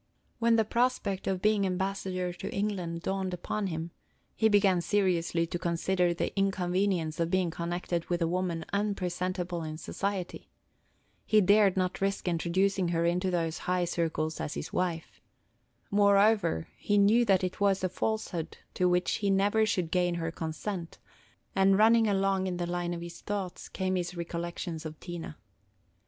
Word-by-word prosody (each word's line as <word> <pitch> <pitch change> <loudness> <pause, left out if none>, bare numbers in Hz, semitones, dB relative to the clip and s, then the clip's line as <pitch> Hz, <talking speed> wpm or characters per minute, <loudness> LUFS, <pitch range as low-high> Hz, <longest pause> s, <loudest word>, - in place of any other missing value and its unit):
When 230 0 +4
the 220 -1 +3
prospect 235 -4 0
of 190 -1 -1
being 210 -1 +3
ambassador 185 -1 -2
to 175 - -6
England 180 -5 -2
dawned 190 -1 -2
upon 200 +3 -3
him, 165 -1 -4 0.4
he 220 - +3
began 195 -4 +4
seriously 170 -2 +1
to 175 +1 -4
consider 175 +1 +1
the 170 - -2
inconvenience 185 -4 0
of 165 0 +1
being 185 -2 +1
connected 170 0 -3
with 175 -1 -1
a 165 - +1
woman 175 -2 -1
unpresentable 180 -3 -2
in 155 -1 -5
society. 190 +2 -4 0.7
He 215 - +4
dared 200 -1 +4
not 185 0 -1
risk 195 -1 -1
introducing 180 +2 +1
her 170 0 +1
into 180 +2 +1
those 165 -2 -1
high 180 -1 +2
circles 160 -2 -2
as 150 - -4
his - - -6
wife. 175 -3 -2 0.7
Moreover, 200 - +3
he 205 - +1
knew 210 +4 +5
that 195 -3 +3
it 185 - -3
was 195 -2 +2
a - - +3
falsehood 185 -4 -3 0.2
to 180 0 +2
which 180 0 +1
he 205 - 0
never 205 +3 +3
should 180 -5 -1
gain 180 -1 +1
her 165 -1 -2
consent; 165 +2 -5 0.6
and 195 0 +4
running 225 +1 +5
along 195 -1 +1
in 180 -1 -2
the 175 - -1
line 175 0 -2
of 170 - -6
his 170 0 -8
thoughts 200 -3 -4
came 185 -1 -1
his 180 -1 -3
recollections 170 -1 -4
of 155 -1 -7
Tina. 170 -3 -7
180 Hz, 160 wpm, -29 LUFS, 170-195 Hz, 0.7 s, knew